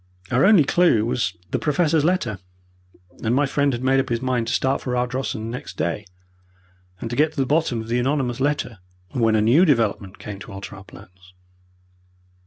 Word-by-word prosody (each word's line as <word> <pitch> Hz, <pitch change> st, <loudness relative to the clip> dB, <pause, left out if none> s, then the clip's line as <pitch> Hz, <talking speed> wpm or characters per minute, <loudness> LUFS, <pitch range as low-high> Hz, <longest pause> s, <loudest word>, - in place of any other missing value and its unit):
Our 125 Hz, +6 st, +4 dB
only 195 Hz, -6 st, +6 dB
clue 140 Hz, -8 st, +3 dB
was 115 Hz, -6 st, -1 dB
the -, -, 0 dB
Professor's 155 Hz, 0 st, +2 dB
letter, 150 Hz, -, 0 dB, 0.8 s
and 115 Hz, +2 st, +1 dB
my 145 Hz, +2 st, +3 dB
friend 140 Hz, 0 st, +1 dB
had 120 Hz, 0 st, -4 dB
made 135 Hz, +1 st, +3 dB
up 135 Hz, -, -1 dB
his 120 Hz, -1 st, 0 dB
mind 125 Hz, -2 st, -1 dB
to -, -, -1 dB
start 135 Hz, +1 st, +1 dB
for 125 Hz, -1 st, -2 dB
Ardrossan 125 Hz, -3 st, -2 dB
next 125 Hz, -, -7 dB
day, 85 Hz, +6 st, -2 dB, 0.9 s
and -, -, -5 dB
to -, -, -2 dB
get 155 Hz, +3 st, +2 dB
to -, -, -21 dB
the 135 Hz, -, +2 dB
bottom 140 Hz, -5 st, +1 dB
of 110 Hz, -, -9 dB
the 120 Hz, +1 st, 0 dB
anonymous 130 Hz, -1 st, 0 dB
letter, 135 Hz, -6 st, -1 dB, 0.3 s
when 115 Hz, -3 st, +2 dB
a 110 Hz, -, +3 dB
new 120 Hz, +11 st, +5 dB
development 110 Hz, -, +1 dB
came 105 Hz, -2 st, -8 dB
to 100 Hz, -, -10 dB
alter 100 Hz, +1 st, -8 dB
our 95 Hz, -, -11 dB
plans. 90 Hz, -1 st, -17 dB
125 Hz, 195 wpm, -22 LUFS, 110-140 Hz, 0.9 s, only